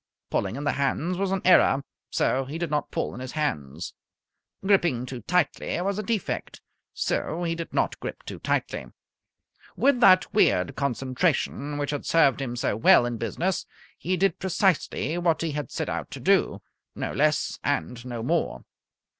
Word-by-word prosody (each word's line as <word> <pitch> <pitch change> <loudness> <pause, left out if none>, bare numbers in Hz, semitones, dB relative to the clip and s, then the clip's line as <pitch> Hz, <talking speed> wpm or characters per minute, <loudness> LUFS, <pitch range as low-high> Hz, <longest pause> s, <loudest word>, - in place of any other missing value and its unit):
Pulling 100 +2 -1
in 140 - -5
the 145 - +2
hands 140 +6 0
was 195 -1 0
an 195 -1 -1
error, 140 -6 +5 0.3
so 135 +1 +1
he 145 +5 -5
did 170 -2 -3
not 150 -1 0
pull - - -2
in - - -8
his 130 0 -6
hands. 80 - -3 0.7
Gripping 175 -11 +3
too 125 -1 -7
tightly 175 - 0
was 200 +2 -1
a - - 0
defect, 215 -3 -3 0.3
so 175 +2 -2
he 165 -1 0
did 165 0 -6
not - - 0
grip - - -6
too - - -7
tightly. - - -2 0.9
With 275 -2 +3
that 185 -4 +6
weird 90 - +3
concentration 140 +2 -1
which 145 -1 -2
had 145 - -4
served 145 -5 +4
him 120 -3 -3
so 120 - 0
well 115 +2 +6
in 120 -1 -2
business 170 - -2 0.3
he 185 +1 -2
did 195 -1 +1
precisely 180 -4 0
what 170 -2 +1
he 165 - -1
had 145 0 -4
set - - -3
out - - -3
to - - -8
do - - +2 0.3
no - - -3
less - - +1
and 115 +10 -1
no 120 -2 -5
more. 165 +6 -1
150 Hz, 170 wpm, -26 LUFS, 125-180 Hz, 0.9 s, that